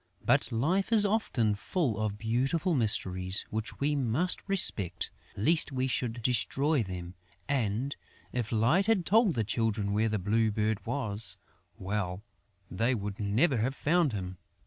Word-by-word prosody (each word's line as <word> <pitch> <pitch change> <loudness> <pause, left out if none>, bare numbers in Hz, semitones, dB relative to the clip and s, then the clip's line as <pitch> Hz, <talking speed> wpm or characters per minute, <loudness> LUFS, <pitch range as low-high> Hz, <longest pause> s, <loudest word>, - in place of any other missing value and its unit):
But - - +2
life 170 - 0
is 215 -2 +6
often 165 - +1
full 115 - -2
of 105 -1 -2
beautiful 130 - 0
mysteries, 95 - +1
which 110 0 -4
we 145 +1 +1
must 140 +7 0
respect, 100 - +2 0.3
lest 155 +8 +3
we 130 -1 -1
should 120 -2 -2
destroy 135 +4 +2
them; 90 -3 -6 0.3
and, 130 0 -1 0.4
if 120 -3 -2
Light 125 - +2
had 210 -6 +2
told 210 - +3
the 115 - +1
Children 110 -2 -1
where 110 +2 +1
the 110 - 0
Blue 110 +3 +1
Bird 105 0 -1
was, 115 -4 -2 0.4
well, 95 -1 -3 0.5
they 120 +3 +1
would 100 -2 -5
never 115 +8 +2
have 125 +5 -1
found 165 0 +2
him! 95 -3 -6
115 Hz, 145 wpm, -29 LUFS, 105-145 Hz, 0.5 s, is